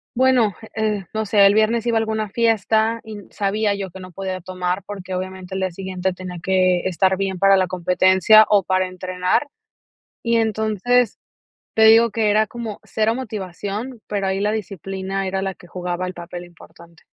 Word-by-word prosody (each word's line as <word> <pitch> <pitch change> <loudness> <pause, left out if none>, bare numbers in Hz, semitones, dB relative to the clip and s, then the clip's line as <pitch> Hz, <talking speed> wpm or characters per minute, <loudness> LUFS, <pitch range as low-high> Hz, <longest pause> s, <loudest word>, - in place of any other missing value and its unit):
bueno, 250 -5 +3 0.2
eh, 215 -3 -1
no 220 0 -1
sé, 200 -1 +5
el 200 +1 +5
viernes 225 +2 +2
iba 230 - +2
a - - +4
alguna 220 -1 -2
fiesta 225 0 +1
y 215 -1 -8
sabía 205 +1 0
yo 195 -2 -5
que 190 - -11
no 185 -1 -11
podía 190 0 -4
tomar, 180 +1 -3
porque, 190 -2 -7
obviamente, 185 0 -5
el - - -2
día 185 -1 -1
siguiente 185 0 -3
tenía 180 -1 -8
que 185 -1 +2
estar 190 +1 +2
bien 195 -2 -2
para 195 0 +5
la 185 -1 +2
competencia 185 +4 +5
o 205 -2 +4
para 185 0 +1
entrenar. 185 +8 -1 0.8
Y 230 0 +2
entonces, 220 +2 +1 0.5
te 220 - +3
digo, 225 +1 +7
que 215 -1 +1
era 215 0 +3
como 230 -3 -6
cero 220 +1 0
motivación, 215 +1 -5
pero, 200 -2 -1
ahí 190 +1 -1
la 210 - +1
disciplina 195 -2 -4
era 190 0 -2
la 190 -1 -3
que 175 - -17
jugaba 180 0 -4
el 180 - -7
papel 175 0 -8
importante. 170 -1 -17
195 Hz, 180 wpm, -21 LUFS, 185-220 Hz, 0.8 s, digo